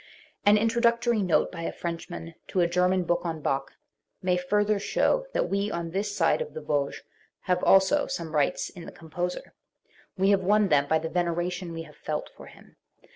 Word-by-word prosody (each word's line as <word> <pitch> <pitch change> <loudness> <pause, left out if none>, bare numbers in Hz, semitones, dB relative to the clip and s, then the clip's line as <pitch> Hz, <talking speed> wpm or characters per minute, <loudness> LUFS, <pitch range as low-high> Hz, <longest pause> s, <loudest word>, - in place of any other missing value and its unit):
An 210 +1 +7
introductory 235 +1 +2
note 180 -4 +2
by 170 - -7
a 165 - -2
Frenchman 170 0 -6
to 185 - -1
a 170 - +4
German 180 +1 +2
book 175 0 0
on 165 -2 -3
Bach 135 -2 -2 0.5
may 185 -1 +1
further 205 +3 +1
show - - +1
that - - +1
we 200 +1 0
on 170 -3 -4
this 200 +3 -1
skit* 185 -5 +2
of - - -6
the 155 - -5
Vosges 145 -2 -1 0.4
have 180 -1 0
also 195 +10 +4
some 170 -12 -5
rights 145 -2 +1
in 170 -2 -10
the - - -8
composer. 175 +2 -5 0.6
We 195 +2 +3
have 195 -1 +3
won 205 +1 +3
them 145 -2 +3
by 160 - +3
the 160 +1 -3
veneration 175 0 -1
we 165 0 -5
have - - -15
felt - - -4
for - - -12
him. - - -17
180 Hz, 190 wpm, -27 LUFS, 165-205 Hz, 0.6 s, An